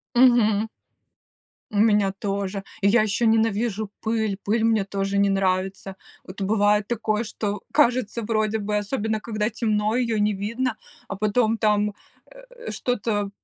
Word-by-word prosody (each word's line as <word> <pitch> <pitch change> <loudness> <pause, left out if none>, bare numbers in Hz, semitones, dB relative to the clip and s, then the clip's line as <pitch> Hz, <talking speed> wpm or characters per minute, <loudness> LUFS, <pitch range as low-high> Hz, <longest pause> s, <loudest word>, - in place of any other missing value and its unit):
Мгм. 225 -4 +4 1.0
У 210 - -5
меня 205 -2 +3
тоже. 200 -1 -3 0.2
И 200 - +4
я 225 +2 +5
еще 215 +2 0
ненавижу 220 -1 +1
пыль, 220 -3 -1
пыль 220 +2 +1
мне 220 -3 +2
тоже 195 0 -2
не 200 - +4
нравится. 190 0 -1 0.3
Вот 185 +2 -11
бывает 205 +1 +2
такое, 220 -1 -1
что 205 -1 -4
кажется, 245 -5 +2
вроде 215 0 0
бы, 210 0 -2
особенно 215 0 -2
когда 215 0 -2
темно, 215 -1 0
ее 235 -3 0
не 210 +1 +2
видно, 225 +5 -2 0.3
а 200 - -4
потом 215 +2 +1
там, 210 -1 +2 0.4
э, - - -11
что-то 210 -4 -1
215 Hz, 145 wpm, -24 LUFS, 200-225 Hz, 1.0 s, я